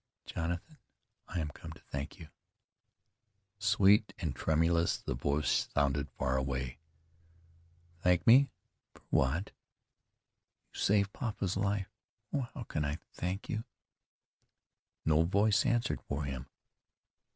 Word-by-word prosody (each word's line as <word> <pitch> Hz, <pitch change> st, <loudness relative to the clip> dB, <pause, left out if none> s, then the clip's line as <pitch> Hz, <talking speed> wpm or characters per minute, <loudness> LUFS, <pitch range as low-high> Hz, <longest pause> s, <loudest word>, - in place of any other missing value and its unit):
"Jonathan, 90 Hz, -, -4 dB, 0.5 s
I 90 Hz, -, -3 dB
am 75 Hz, -2 st, -1 dB
come -, -, -10 dB
to -, -, -15 dB
thank 70 Hz, +2 st, -4 dB
you." 80 Hz, -2 st, -11 dB, 1.3 s
Sweet 105 Hz, 0 st, +4 dB
and 80 Hz, -7 st, -3 dB
tremulous, 85 Hz, +4 st, +2 dB
the -, -, -4 dB
voice 70 Hz, +4 st, +1 dB
sounded 70 Hz, 0 st, +1 dB
far 65 Hz, 0 st, -1 dB
away. 65 Hz, -1 st, -2 dB, 1.2 s
"Thank 90 Hz, -1 st, +3 dB
me? 130 Hz, +4 st, +7 dB, 0.5 s
For -, -, -18 dB
what?" 75 Hz, +10 st, +2 dB, 1.2 s
"You -, -, -8 dB
saved 100 Hz, -1 st, +3 dB
papa's 105 Hz, -5 st, -2 dB
life. 100 Hz, 0 st, 0 dB, 0.4 s
Oh! 130 Hz, -4 st, -1 dB
how 125 Hz, -, -5 dB
can 75 Hz, -8 st, -2 dB
I 75 Hz, +1 st, -1 dB, 0.2 s
thank 90 Hz, +3 st, -3 dB
you?" 110 Hz, 0 st, -2 dB, 1.4 s
No 80 Hz, 0 st, +4 dB
voice 100 Hz, +4 st, +3 dB
answered 120 Hz, 0 st, +1 dB
for 70 Hz, +1 st, -2 dB
him. 65 Hz, -2 st, -4 dB
85 Hz, 120 wpm, -33 LUFS, 70-100 Hz, 1.4 s, me